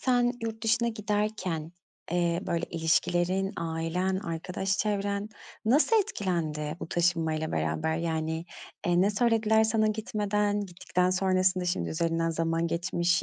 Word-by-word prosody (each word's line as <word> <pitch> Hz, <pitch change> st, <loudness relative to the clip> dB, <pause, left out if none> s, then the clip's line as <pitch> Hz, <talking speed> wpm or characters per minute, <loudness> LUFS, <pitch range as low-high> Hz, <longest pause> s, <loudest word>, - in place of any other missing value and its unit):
sen 245 Hz, -1 st, +3 dB
yurt 225 Hz, 0 st, -4 dB
dışına 235 Hz, +1 st, +2 dB
giderken, 205 Hz, -7 st, -2 dB, 0.4 s
eee, 175 Hz, -1 st, +1 dB
böyle 170 Hz, 0 st, 0 dB
ilişkilerin, 175 Hz, +4 st, +1 dB
ailen, 170 Hz, +3 st, -1 dB
arkadaş 180 Hz, +3 st, -2 dB
çevren 205 Hz, 0 st, -1 dB, 0.4 s
nasıl 295 Hz, -, +4 dB
etkilendi 165 Hz, -, -1 dB
bu -, -, -5 dB
taşınmayla 165 Hz, -3 st, 0 dB
beraber, 80 Hz, -, 0 dB
yani, 160 Hz, 0 st, -2 dB, 0.4 s
eee, 175 Hz, 0 st, +3 dB
ne 200 Hz, +3 st, +4 dB
söylediler 220 Hz, 0 st, +3 dB
sana 220 Hz, 0 st, +2 dB
gitmeden? 210 Hz, -1 st, 0 dB
Gittikten 180 Hz, -1 st, -1 dB
sonrasında, 185 Hz, -1 st, +2 dB
şimdi 175 Hz, -, -1 dB
üzerinden 165 Hz, 0 st, 0 dB
zaman 165 Hz, +1 st, 0 dB
geçmiş, 175 Hz, +1 st, +1 dB
180 Hz, 125 wpm, -28 LUFS, 165-210 Hz, 0.4 s, nasıl